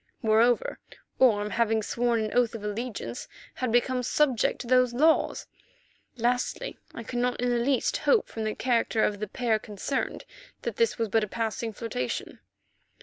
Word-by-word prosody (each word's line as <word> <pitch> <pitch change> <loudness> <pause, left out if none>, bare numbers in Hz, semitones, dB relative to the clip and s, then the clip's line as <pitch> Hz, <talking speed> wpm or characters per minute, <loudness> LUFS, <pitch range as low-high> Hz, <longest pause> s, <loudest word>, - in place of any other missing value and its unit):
Moreover, 225 +2 +3 0.4
Orme, 210 -5 +4
having 225 -1 +1
sworn 235 +1 0
an 215 -1 -3
oath 240 -2 +2
of 215 - -7
allegiance, 210 - -4 0.3
had 255 -3 -2
become 250 +2 +2
subject 255 -1 +1
to - - -7
those 250 -1 +3
laws. 315 +5 +3 0.7
Lastly, 245 - -1 0.2
I 230 - -6
could 240 +2 -4
not 245 0 0
in 245 0 +1
the 240 - +1
least 255 +1 +1
hope 460 - +2
from 220 - -5
the 215 0 -2
character 230 -3 +1
of 205 -1 0
the 215 - -3
pair 225 +1 0
concerned 210 +6 -4 0.4
that - - -3
this 465 -1 +2
was 230 -2 0
but 220 +2 +2
a - - -2
passing 225 +1 -3
flirtation. 205 - -4
235 Hz, 165 wpm, -27 LUFS, 215-250 Hz, 0.7 s, Orme